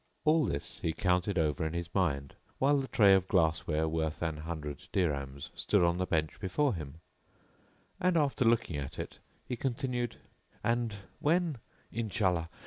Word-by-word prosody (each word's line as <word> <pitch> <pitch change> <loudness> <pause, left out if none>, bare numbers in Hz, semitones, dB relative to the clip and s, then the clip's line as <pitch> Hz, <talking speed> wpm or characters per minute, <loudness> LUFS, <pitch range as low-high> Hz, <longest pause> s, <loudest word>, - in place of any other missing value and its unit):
All 155 -1 +5
this 70 - -3
he 80 - -1
counted 90 +2 +1
over 80 -1 +1
in 80 0 -2
his 85 0 -4
mind, 70 -8 0 0.2
while 145 +2 +4
the 135 - -3
tray 100 -6 +6
of 95 -1 +3
glass 85 -4 +2
ware,: 80 0 +1
worth 80 0 -1
an 80 -2 -1
hundred 75 -3 -6
dirhams, 70 -6 -1
stood - - +2
on 85 +1 +2
the 95 - 0
bench 80 -1 0
before 130 +8 +1
him, 80 -2 -7 1.0
and, 180 -1 +3
after 145 -4 +2
looking 115 -9 +2
at 70 -2 -5
it, - - -6 0.3
he 125 - -2
continued, 125 -1 -2 0.5
"And 115 -2 +1 0.2
when, 165 -3 +1 0.3
Inshallah! 95 -7 0
90 Hz, 160 wpm, -31 LUFS, 80-120 Hz, 1.0 s, tray